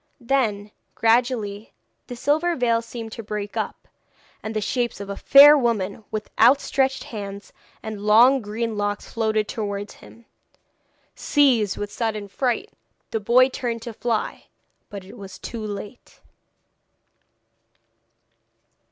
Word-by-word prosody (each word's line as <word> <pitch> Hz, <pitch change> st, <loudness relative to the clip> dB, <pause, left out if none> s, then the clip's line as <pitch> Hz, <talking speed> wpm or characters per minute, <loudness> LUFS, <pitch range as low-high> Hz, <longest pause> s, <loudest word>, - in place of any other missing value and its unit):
Then 230 Hz, -5 st, -1 dB, 0.2 s
gradually 225 Hz, -3 st, 0 dB, 0.3 s
the 245 Hz, -, -7 dB
silver 310 Hz, +7 st, +1 dB
veil 235 Hz, -3 st, +1 dB
seemed 230 Hz, -1 st, -8 dB
to 230 Hz, -, -7 dB
break 210 Hz, -1 st, -5 dB
up, -, -, -4 dB, 0.5 s
and 220 Hz, 0 st, -6 dB
the -, -, +1 dB
shapes 240 Hz, +2 st, -2 dB
of 200 Hz, 0 st, -7 dB
fair 285 Hz, +2 st, +9 dB
women 225 Hz, -6 st, -1 dB
with 215 Hz, -1 st, -5 dB
outstretched 265 Hz, +2 st, +3 dB
hands 200 Hz, -2 st, -8 dB, 0.3 s
and 215 Hz, -2 st, -6 dB
long 235 Hz, +6 st, +5 dB
green 220 Hz, +1 st, -3 dB
locks 205 Hz, 0 st, -3 dB
floated 220 Hz, -2 st, 0 dB
towards 205 Hz, -2 st, -4 dB
him. 235 Hz, -, -16 dB, 0.9 s
Seized 250 Hz, -9 st, +2 dB
with 205 Hz, 0 st, -5 dB
a -, -, -14 dB
sudden 215 Hz, -3 st, -3 dB
fright, 255 Hz, -, -2 dB, 0.4 s
the 225 Hz, -, -1 dB
boy 240 Hz, +5 st, +4 dB
turned 235 Hz, -3 st, -4 dB
to 235 Hz, -, -7 dB
fly. 230 Hz, 0 st, -3 dB, 0.4 s
But 200 Hz, -3 st, -8 dB
it 195 Hz, -, -13 dB
was 195 Hz, -2 st, -10 dB
too 230 Hz, -2 st, -7 dB
late. 210 Hz, +3 st, -8 dB
225 Hz, 125 wpm, -23 LUFS, 205-245 Hz, 0.9 s, fair